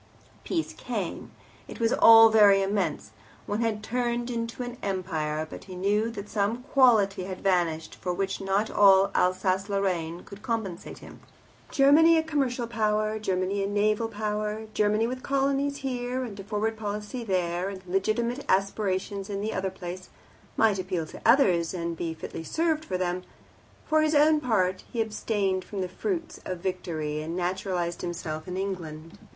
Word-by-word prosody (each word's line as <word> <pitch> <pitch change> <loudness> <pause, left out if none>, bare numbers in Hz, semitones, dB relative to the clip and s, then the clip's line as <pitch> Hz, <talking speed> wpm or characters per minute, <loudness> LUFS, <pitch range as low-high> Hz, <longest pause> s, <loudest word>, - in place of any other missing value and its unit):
Peace 330 -3 -2
came - - -5 0.4
it - - -9
was 230 0 +2
all 225 0 +9
very 205 -3 +6
immense, 195 -6 -1 0.3
one 210 +2 -2
had 220 -2 -1
turned 240 0 -1
into 230 +1 -3
an 245 0 -7
Empire 160 -5 -2
but - - -10
he 185 - -9
knew 205 +4 +1
that 205 -3 -7
some 220 +3 -1
quality 220 -9 +3
had 185 -1 -6
vanished 175 -4 0
for 180 - -4
which 195 +2 -2
not 195 +3 0
all 195 -1 +6
Alsace 185 +2 +1
Lorraine 180 -4 -1
could 200 0 -12
compensate 220 -8 -4
him. - - -13 0.5
Germany 310 +4 +6
a 320 - +2
commercial 270 -6 -1
Power, 215 -1 0
Germany 195 0 -1
a - - 0
naval 210 +2 +1
Power, 210 0 -3
Germany 210 +1 +2
with 255 +2 -4
colonies 275 +1 0
here 250 0 -2
and 210 -5 -7
a - - -6
Forward 215 +2 -2
Policy 210 +3 -4
there, 180 -2 -1
and 190 -1 -9
legitimate 220 +8 0
aspirations 195 0 0
in 200 -1 -3
the 215 +2 -2
other 190 0 -1
place, 185 -1 -8 0.5
might 215 -3 +3
appeal 185 -3 -2
to - - -11
others, 185 - +4
and 170 -1 -3
be 165 0 -4
fitly 160 - -7
served 315 - -1
by 185 - 0
them; 180 0 -1 0.6
for 310 -1 +3
his 310 0 +2
own 305 +1 +5
part, 190 -9 0
he 235 - -4
abstained 205 -3 -1
from 200 0 -5
the 185 - -1
fruits 335 - -4
of 185 - -4
victory, 170 -5 -3
and 160 +2 -5
naturalized 180 -1 -2
himself 165 -2 -5
in 180 0 -4
England. 165 -5 -5
200 Hz, 165 wpm, -27 LUFS, 185-230 Hz, 0.6 s, all